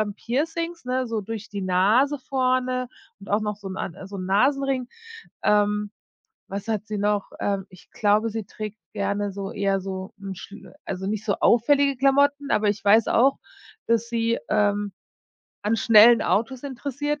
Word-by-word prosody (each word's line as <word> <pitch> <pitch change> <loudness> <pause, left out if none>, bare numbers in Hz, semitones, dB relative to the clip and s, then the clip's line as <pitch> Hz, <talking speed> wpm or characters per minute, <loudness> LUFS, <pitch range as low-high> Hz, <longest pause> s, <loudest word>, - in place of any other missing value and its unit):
Piercings, 330 +6 -3
ne, 255 0 -1
so 225 -1 -2
durch 215 +1 -7
die 200 -1 -5
Nase 210 +11 +3
vorne 255 -1 0 0.3
und 195 - -13
auch 205 +2 +2
noch 210 -1 -3
so 200 -2 -9
'n 185 - -6
and 190 0 -5
so 200 - -7
'n 185 - -5
Nasenring. 260 +5 +1 0.6
Ähm. 210 0 +2 0.6
Was 200 +2 -5
hat 215 -1 -2
sie 210 -1 -4
noch? 205 0 0
Ähm, 200 -1 -1
ich 185 - -18
glaube, 215 +2 +2
sie 220 -1 -4
trägt 215 +1 -7 0.2
gerne 200 0 -1
so 195 0 -5
eher 195 -1 0
so 190 0 -6
'n 195 -1 -6
schlüder, 200 0 -12
also 190 0 -4
nicht 215 +1 -3
so 200 - +1
auffällige 275 +3 +4
Klamotten, 280 +1 +2
aber 210 0 +2
ich 205 0 -5
weiß 215 +2 +5
auch, 265 +4 +3 0.5
dass 230 0 +1
sie, 230 0 0
ähm, 205 -1 +1 0.7
an 215 +2 +1
schnellen 230 +1 +7
Autos 230 +7 0
interessiert 285 +2 -3
215 Hz, 165 wpm, -24 LUFS, 200-255 Hz, 0.7 s, schnellen